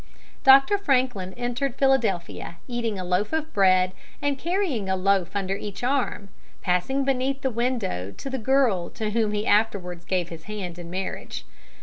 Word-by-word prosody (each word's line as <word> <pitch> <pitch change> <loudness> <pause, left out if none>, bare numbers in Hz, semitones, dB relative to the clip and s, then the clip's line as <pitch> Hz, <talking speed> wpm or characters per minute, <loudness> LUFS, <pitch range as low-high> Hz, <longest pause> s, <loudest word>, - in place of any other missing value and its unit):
Dr. 275 +9 +7
Franklin 250 - +1
entered 245 +2 -2
Philadelphia 210 -11 0
eating 235 -4 -2
a 185 - -3
loaf 180 - 0
of 315 0 -2
bread 185 -2 +4 0.3
and 285 -1 -1
carrying 335 - -1
a 190 - +2
loaf 190 -1 +1
under 195 -1 -1
each 200 +2 -7
arm, 250 -6 0 0.3
passing 190 +10 +1
beneath 270 +1 0
the 265 - +1
window 230 - -1
of 100 - -12
the 265 -1 -4
girl 235 -7 +2
to 215 -2 -3
whom 220 -1 +1
he 210 +1 -1
afterwards 200 -5 +1
gave 175 -1 -1
his 165 -1 -9
hand 190 -5 -5
in 170 -1 -8
marriage. 185 - -5
210 Hz, 160 wpm, -25 LUFS, 185-265 Hz, 0.3 s, Dr